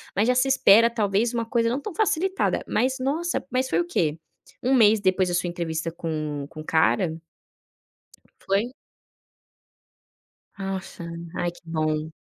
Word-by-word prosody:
mas 205 +4 +2
já 250 - +4
se 255 +2 +3
espera 230 -4 +6
talvez 220 0 0
uma 230 -1 -1
coisa 230 0 +1
não 250 +4 -1
tão 415 - -6
facilitada. 385 -2 +1
Mas, 255 +4 +1
nossa, 315 +7 -1
mas 255 +1 0
foi - - +1
o 345 - +1
quê? 160 - 0 0.5
Um 260 - +2
mês 220 -4 +5
depois 185 -1 +2
da 175 - 0
sua 175 - 0
entrevista 165 -1 -3
com 155 -4 -4
o - - -13
com 155 - -10
o - - -11
cara? 160 +3 +2 1.4
Foi? 205 +6 +1 1.9
Nossa. 190 -2 -5 0.3
Ai, 175 - -1
que 175 - -17
bom. 155 -1 -1
200 Hz, 155 wpm, -25 LUFS, 170-255 Hz, 1.9 s, espera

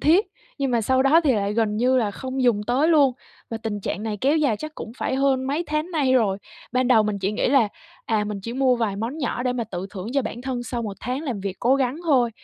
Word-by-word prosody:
thiết, 350 +8 +4 0.3
nhưng 275 -2 0
mà 235 -1 +2
sau 260 +4 +2
đó 300 +5 +5
thì 270 - +4
lại 200 -1 0
gần 220 -2 +1
như 255 +3 +3
là 220 -5 +1
không 260 +5 -4
dùng 240 -4 +3
tới 270 +7 +2
luôn 285 -6 +5 0.4
và 225 - -2
tình 220 -2 -4
trạng 200 - -3
này 215 -1 -3
kéo 285 +4 +3
dài 280 -8 +2
chắc 310 +6 -7
cũng 220 - -7
phải - - -1
hơn 265 -1 +2
mấy 300 +5 -1
tháng 305 +3 -2
nay 290 -6 +1
rồi. 210 -6 +2 0.3
Ban 255 0 +1
đầu 225 -4 +6
mình 210 -1 -2
chỉ 195 +2 -1
nghĩ - - 0
là, 250 -5 +4 0.4
à, 215 -2 0
mình 210 -1 -4
chỉ 230 +4 -5
mua 255 -1 +2
vài 220 -4 -1
món 230 +9 -4
nhỏ 270 -4 -2
để 250 -1 0
mà 240 -2 -2
tự 190 -3 -5
thưởng 195 0 -6
cho 275 0 +2
bản 240 +1 -6
thân 255 -2 -3
sau 240 0 -4
1 205 -3 -5
tháng 255 +5 -3
làm 250 -10 -3
việc 195 -1 -4
cố 250 +3 +4
gắng 260 0 0
thôi, 260 -7 +3
245 Hz, 270 wpm, -23 LUFS, 215-270 Hz, 0.4 s, đầu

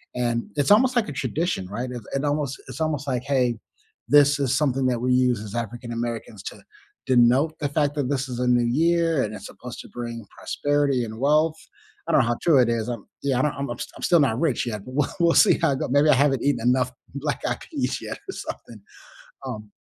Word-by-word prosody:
and 120 -1 0
it's 145 +2 +1
almost, 250 +5 +5
like, 235 -3 +2
a - - -4
tradition, 135 - -2
right? 120 +6 -4
It 120 -1 -6
it 135 +2 -1
almost 145 -2 -1
it's - - -8
almost, 150 -3 -1
like, 125 -3 -1
"Hey, 125 -4 +1 0.5
this 145 0 +5
is 135 -2 +1
something 135 -3 +1
that 125 -1 +1
we 125 +1 +2
use 125 -3 +2
as 105 -1 -8
African 120 +1 -5
Americans 115 -3 -4
to - - -8 0.4
denote 130 +5 +4
the 145 - 0
fact 145 0 0
that 140 -4 -1
this 135 -2 -1
is 125 -1 -5
a 125 - 0
new 120 -1 +4
year 165 +3 +2
and 105 - -4
it's 100 - -8
supposed 125 -1 -10
to - - -14
bring 120 -1 -6
prosperity 145 -3 0
and 110 0 -8
wealth." 155 +4 +2 0.5
I - - 0
don't - - +6
know - - 0
how 120 0 0
true 155 -6 +4
it 120 - +2
is. 115 -1 -1
I'm 120 -4 -5 0.2
yeah, 135 -3 +1
I'm - - +2 0.2
I'm 120 - -4
st - - -5
I'm - - -10
still 170 - +4
not 120 -4 +1
rich 150 -6 0
yet, 105 -3 -4
but 130 - -9
we'll 150 - +1
we'll 170 -1 +4
see - - +6
how 140 - +3
it 135 - -3
go - - -2
maybe 145 +3 +4
I - - +7
haven't 135 -2 +2
eaten 125 -5 0
enough 125 0 +2 0.2
black-eyed 140 -2 -2
peas - - -3
yet - - -6
or - - -3
something, 110 -4 -8 0.7
um 105 -5 -7
130 Hz, 230 wpm, -24 LUFS, 120-145 Hz, 0.7 s, I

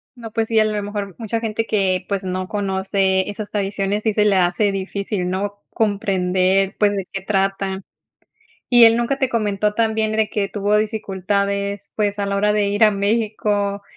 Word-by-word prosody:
No, 230 -3 -9
pues 225 -1 -1
sí, 225 -1 +3
a 215 - +4
lo 210 -1 -1
mejor, 205 -2 -5
mucha 225 0 -3
gente 225 0 -2
que, 190 -4 0
pues, 200 -1 -2
no 185 0 -3
conoce 195 -2 0
esas 205 0 -6
tradiciones 200 0 -2
sí 220 - +1
se 210 0 +2
le 205 -2 +3
hace 185 +3 +2
difícil, 195 -1 -3
¿no? 200 +2 -3
Comprender, 195 -2 +1
pues, 205 -1 +2
de 195 -2 -4
qué 195 - -4
trata. 195 0 -1 0.9
¿Y 240 -2 +8
él 225 +1 +6
nunca 270 +3 0
te 265 -1 0
comentó 210 -2 0
también 220 -1 0
de 220 -1 +1
que 200 -2 -1
tuvo 205 0 +1
dificultades, 200 -1 -2
pues, 205 -1 0
a 200 - -1
la 200 0 -1
hora 210 +1 +2
de 210 -1 +1
ir 205 +2 +3
a 215 - +6
México? 205 -1 0
205 Hz, 185 wpm, -20 LUFS, 195-215 Hz, 0.9 s, Y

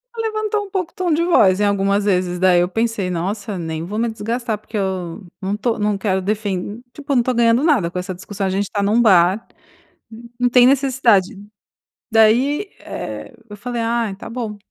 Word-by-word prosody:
Ela 455 -1 -2
levantou 430 -1 -2
um - - -13
pouco 370 -3 -3
o - - -47
tom 365 -4 -1
de 325 +2 +1
voz, 200 - +4
em 210 - +2
algumas 200 0 +1
vezes 180 -3 0
daí 185 -1 +4
eu 175 - +1
pensei: 225 -2 -1
"Nossa, 195 +4 -3
nem 160 -2 -4
vou 210 +5 -4
me 235 0 +1
desgastar, 225 +1 -3
porque 215 +1 -7
eu 190 -1 -3 0.2
não 195 +1 -2
estou 225 +2 -1
não 210 -1 0
quero 190 -1 0
defen 205 +1 -3
tipo, 290 -1 -4
não 250 - +4
estou 255 +2 -1
ganhando 235 +2 +3
nada 270 - +2
com 180 - -3
essa 185 +1 -5
discussão, 195 +2 -4
a - - 0
gente 195 +2 0
está 200 +1 -3
num 215 +4 +3
bar, 190 -1 +4 0.9
não 245 0 +2
tem 245 0 +6
necessidade", 255 -8 +3 0.8
daí 245 - +3
eh, - - -7 0.2
eu 210 - -8
falei: 240 +2 -4
"Ah, 230 -2 -1
tá - - -9
bom, 230 -3 -5
215 Hz, 200 wpm, -19 LUFS, 190-245 Hz, 0.9 s, tem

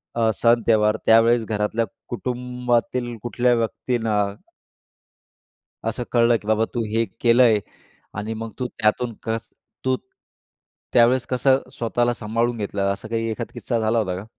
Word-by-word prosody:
अ, 115 -1 +2
सण 115 +2 +3
त्यौहार 105 -1 +4
त्यावेळेस 115 +1 +5
घरातल्या 110 +1 -1 0.2
कुटुंबातील 125 0 -2
कुठल्या 120 +1 +1
व्यक्तींना 115 -1 -1 1.7
असं 125 - -4
कळलं 115 -1 +4
की 105 - -13
बाबा 110 +1 +2
तू 120 -2 -1
हे 115 0 +2 0.2
केलं 120 +1 +5
आहे 110 -3 +5 0.6
आणि 110 +2 -3
मग 115 0 -6
तू 125 - -1
त्यातून 115 +2 0
कस 115 0 -3 0.4
तू 130 0 +3 1.0
त्यावेळेस 120 +1 +4
कसं 130 +1 +3
स्वतःला 120 0 0
सांभाळून 115 +2 -1
घेतलं 100 -1 -1
असं 100 - -9
काही 115 0 -1
एखादा 115 +1 -5
किस्सा 120 -2 -2
झाला 110 +1 +1
होता 95 -4 -1
का? 95 +3 -7
115 Hz, 140 wpm, -23 LUFS, 110-120 Hz, 1.7 s, त्यावेळेस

